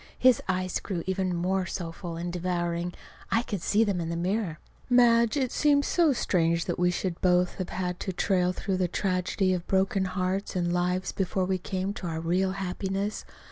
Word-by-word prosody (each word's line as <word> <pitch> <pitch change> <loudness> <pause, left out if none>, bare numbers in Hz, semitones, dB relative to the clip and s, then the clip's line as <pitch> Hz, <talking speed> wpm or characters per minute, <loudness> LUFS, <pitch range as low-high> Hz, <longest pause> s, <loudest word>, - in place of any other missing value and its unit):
His 255 -2 +5
eyes 185 -1 0
grew 175 -4 -4
even 190 -1 -1
more 185 +2 0
soulful 170 -1 -5
and 175 +1 -4
devouring. 175 -1 -2 0.3
I 230 - +2
could 205 -7 -4
see 210 +5 +3
them 200 -5 0
in 165 - -3
the 170 - -2
mirror. 180 -1 -1 0.3
"Madge, 235 0 +5
it 260 -3 0
seems 285 -1 +3
so 335 -4 +3
strange 170 -8 +1
that - - -2
we 180 0 +4
should 180 -1 -2
both 180 0 +2
have 185 - -3
had 180 -1 -3
to 190 - -3
trail 180 -1 +1
through 185 +1 -2
the 185 -1 +1
tragedy 185 +1 0
of 180 -1 -3
broken 190 0 +2
hearts 185 +2 -2
and 175 -1 0
lives 180 +1 0
before 190 -1 -1
we 185 0 0
came 190 +2 -3
to 185 - -6
our 160 -1 -3
real 185 +3 +1
happiness. 195 +2 -3
185 Hz, 190 wpm, -28 LUFS, 175-195 Hz, 0.3 s, His